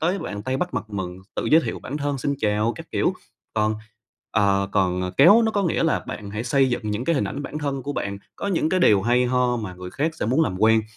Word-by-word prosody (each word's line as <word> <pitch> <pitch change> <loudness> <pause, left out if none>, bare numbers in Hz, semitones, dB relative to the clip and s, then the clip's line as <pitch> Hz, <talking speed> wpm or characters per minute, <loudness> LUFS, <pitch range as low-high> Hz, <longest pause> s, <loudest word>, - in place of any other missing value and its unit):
tới 175 +5 +1
bạn 100 - -5
tay 130 +3 -1
bắt 180 +5 -3
mặt - - -2
mừng, 95 -3 -4 0.2
tự - - -1
giới 160 +2 +5
thiệu - - -4
bản 145 - -6
thân, 145 -1 -2
xin 140 +2 -1
chào 105 -1 +1
các - - -9
kiểu. - - +1 0.4
Còn, 110 0 +1 0.6
ờ, 100 -2 +2
còn 90 -1 +1
kéo 200 +11 +7
nó 220 - +2
có 205 -2 0
nghĩa 170 - +1
là 160 - +2
bạn 100 -1 -6
hãy 105 +3 -4
xây 130 +1 +2
dựng 120 - -1
những 105 +4 -2
cái 170 - +2
hình 135 - +1
ảnh 140 - -4
bản 150 +2 -5
thân 140 -3 -3
của 145 - -4
bạn, 100 -7 -3 0.2
có - - -4
những 170 -5 +1
cái 185 +2 +1
điều 105 - +5
hay 120 +3 +3
ho 125 0 +1
mà 105 -6 -5
người 90 0 -8
khác 155 - -1
sẽ - - -3
muốn 130 +8 +3
làm 95 - -1
quen. 110 0 +5
125 Hz, 265 wpm, -23 LUFS, 105-150 Hz, 0.6 s, kéo